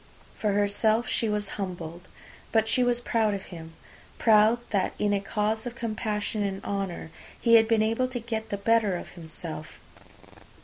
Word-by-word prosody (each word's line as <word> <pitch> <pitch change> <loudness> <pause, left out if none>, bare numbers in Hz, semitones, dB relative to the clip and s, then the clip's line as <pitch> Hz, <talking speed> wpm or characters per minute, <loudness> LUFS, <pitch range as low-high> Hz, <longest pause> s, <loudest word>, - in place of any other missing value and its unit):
For 210 -2 0
herself 210 +3 +2
she 225 - 0
was 210 -1 -2
humbled; 175 -2 -6 0.4
but 220 -1 +3
she 250 +3 +3
was 245 -1 +2
proud 225 -3 +1
of 195 - -7
him, 165 -1 -9 0.4
proud 220 +1 +5
that 195 -3 +1
in 205 -1 +1
a 200 - +1
cause 215 +3 -1
of 240 - -6
compassion 215 -2 -2
and 195 -1 -2
honour 195 -5 -3 0.3
he 230 - +3
had 225 -1 +7
been 225 -1 +3
able 230 +4 +1
to 255 -1 -4
get 220 -1 -4
the 200 - -2
better 215 -1 +2
of - - -6
himself. 160 -2 -8
210 Hz, 170 wpm, -27 LUFS, 195-225 Hz, 0.4 s, had